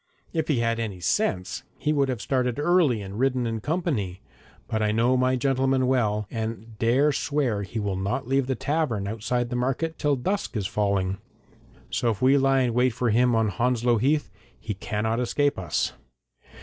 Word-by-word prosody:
If 160 -2 -1
he 135 -7 +1
had 115 0 0
any 105 -5 -4
sense 90 +1 0 0.2
he 150 - 0
would 140 -2 +2
have 125 -3 -3
started 125 -3 0
early 150 - +3
and 100 +3 -7
ridden 130 -1 +1
in 115 -1 -2
company, 140 - -2 0.5
but 110 - -1
I 105 0 +2
know 115 +4 +3
my 130 0 +2
gentleman 135 0 +1
well, 110 -5 +1
and 110 -1 -5
dare 130 +6 +3
swear 135 -7 0
he 100 +3 -4
will 100 -2 -1
not 100 +6 -2
leave 135 0 +1
the 130 - 0
tavern 140 -11 -1
outside 120 +3 -2
the - - -1
market 135 +6 -1
till 145 -1 +2
dusk 185 - -2
is 100 - -2
falling. 100 -2 0 0.7
So 120 - +1
if 105 -4 -1
we 130 +2 +5
lie 135 0 +3
in 125 -2 +1
wait 125 0 +2
for 120 -1 0
him 120 +2 +3
on 110 -1 +2
Hounslow 120 +2 +1
Heath, 145 +6 +1 0.3
he 105 - -4
cannot 105 +4 -2
escape 145 +2 +1
us.' 85 -4 -1
120 Hz, 185 wpm, -25 LUFS, 110-135 Hz, 0.7 s, we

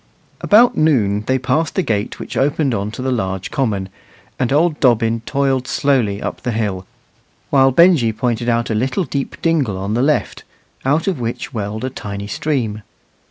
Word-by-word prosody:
About 230 +4 +5
noon 110 -10 +2
they 130 - +2
passed 130 +5 -1
the 190 - +1
gate 105 -3 -2
which - - -7
opened 140 -1 +1
on 100 -1 -2
to 120 +4 -7
the 130 - 0
large 95 -5 -2
common, 105 -9 -1 0.5
and 130 -1 0
old 155 +2 +2
Dobbin 115 -3 +2
toiled 135 -2 0
slowly 120 -8 +1
up - - -5
the 125 - -2
hill, 100 -4 -2 0.6
while 135 -1 +5
Benjy 155 -5 +5
pointed 120 +1 -1
out 115 0 0
a - - +1
little 130 - 0
deep 140 -2 -4
dingle 145 - +1
on 100 +2 -3
the 120 - +1
left, 150 +3 0 0.4
out 150 +5 +2
of 185 -8 0
which 115 0 -4
welled 110 0 -4
a 130 - -2
tiny 100 -4 -6
stream. 110 -3 -2
125 Hz, 175 wpm, -18 LUFS, 105-140 Hz, 0.6 s, About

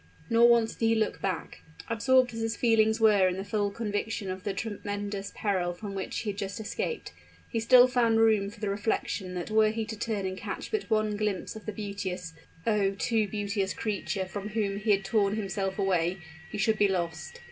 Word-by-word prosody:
Nor 235 +1 +6
once 235 -1 +4
did 230 - -2
he 225 - +4
look 220 -1 -1
back. 185 -4 -3 0.3
Absorbed 250 +2 +3
as 225 - -5
his 225 0 -1
feelings 220 -1 +3
were 210 -4 +5
in 185 0 -1
the 190 - -3
full 205 -1 0
conviction 205 -1 -3
of 185 0 -6
the 205 - -1
tremendous 205 -1 -4
peril 185 -4 0
from 200 +2 -7
which 195 -1 -4
he 210 - -2
had 200 - -8
just 200 +1 -4
escaped, 345 - -4 0.3
he 230 - -2
still 245 +2 +7
found 235 -3 +3
room 215 -3 +4
for 210 +1 -14
the 210 - -2
reflection 200 -2 -2
that 180 +4 -4
were 215 0 +5
he 220 0 -2
to 220 0 -5
turn 215 -3 -2
and 190 0 -4
catch - - -5
but 435 - -2
one 215 -1 +1
glimpse 210 -2 -2
of 220 - -10
the - - -1
beauteous, 195 -5 -5 0.3
oh! 205 -3 +2
too 220 -1 +1
beauteous 200 -1 -2
creature 200 -2 -2
from 200 +2 -6
whom 210 -2 -1
he 210 +2 -4
had 195 -1 +3
torn 200 0 +2
himself 195 -2 -2
away, 185 -2 +1 0.3
he - - -5
should 215 +1 +1
be 205 - +5
lost. 170 -5 -3
205 Hz, 205 wpm, -29 LUFS, 195-220 Hz, 0.3 s, still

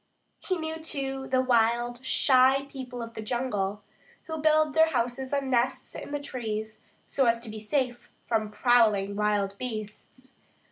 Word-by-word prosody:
He 370 - -2
knew, 320 0 -4
too, 270 -4 -4
the 260 0 +2
wild, 240 0 +1
shy 265 +1 +4
people 255 -3 -7
of 230 0 -8
the 220 - -6
jungle, 210 -4 -2 0.4
who 320 -1 -5
build 310 -1 +3
their 320 +2 +5
houses 250 -1 -2
like 280 -1 +1
nests 255 -1 0
in - - -7
the 290 - -2
trees, 220 -6 -5 0.2
so 270 -4 +1
as 230 0 +3
to 230 -2 -6
be 215 - -7
safe 245 +2 -2 0.2
from 220 -2 0
prowling 210 -4 +3
wild 205 -1 0
beasts. 250 +3 -7
245 Hz, 155 wpm, -28 LUFS, 220-270 Hz, 0.4 s, their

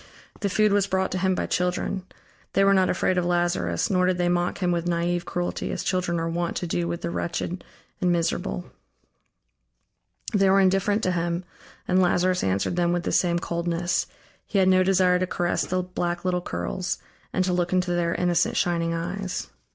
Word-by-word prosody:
The 200 - -1
food 210 +1 +3
was 200 -1 +3
brought 190 0 0
to 185 - -1
him 190 0 +2
by - - -1
children; 180 +1 -1 0.5
they 195 - +4
were 195 0 +5
not 190 -1 +3
afraid 185 0 +1
of - - 0
Lazarus, 175 - 0
nor 180 -1 +3
did 185 -1 +1
they 175 0 +1
mock 175 0 0
him 180 -2 0
with 170 0 -1
naive 175 0 0
cruelty, 175 0 -3
as - - -3
children 180 -2 0
are 165 - -1
wont 170 +1 -2
to - - -2
do 170 0 -1
with 170 0 -3
the 170 - -3
wretched 175 +1 -3 0.4
and 180 -1 +3
miserable. 165 - -1 1.7
They 195 -2 +4
were 195 +1 +5
indifferent 195 +3 +2
to 185 - +2
him, 170 0 -1 0.4
and 185 +1 +3
Lazarus 180 0 +2
answered 95 - 0
them 175 0 +2
with 175 -1 -1
the - - -2
same 175 -1 +2
coldness; 170 0 -1 0.4
he 205 - -1
had 190 -1 +5
no 185 0 +5
desire 185 -1 +3
to 185 - 0
caress 175 -1 -1
the 185 0 0
black 175 -1 -3
little 180 -1 +1
curls, 175 - -3 0.3
and 185 - +1
to 180 - 0
look 175 -1 0
into 180 -1 +1
their 170 -1 0
innocent 175 -1 +1
shining 170 -1 +1
eyes. 180 +3 -4
180 Hz, 195 wpm, -25 LUFS, 175-185 Hz, 1.7 s, were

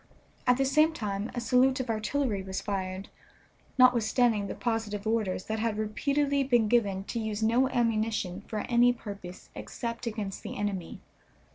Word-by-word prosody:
At 250 0 +5
the 270 - +2
same 305 +4 +4
time 205 -5 -3
a - - -1
salute 255 +2 +3
of 250 -3 -1
artillery 220 -1 -1
was 190 0 -4
fired, 190 -1 -4 0.7
notwithstanding 240 -3 +4
the - - -5
positive 225 -3 -2
orders 215 -5 0
that 220 0 -2
had 220 -1 -1
repeatedly 280 +6 0
been 240 -4 +3
given 205 -4 +2
to 230 - -4
use 220 -1 -3
no 240 +4 +3
ammunition 220 -6 0
for 215 -1 -3
any 245 0 +4
purpose 200 -6 -9
except 235 0 -5
against 210 -3 -4
the - - -6
enemy. 200 -4 -3
225 Hz, 155 wpm, -29 LUFS, 205-245 Hz, 0.7 s, At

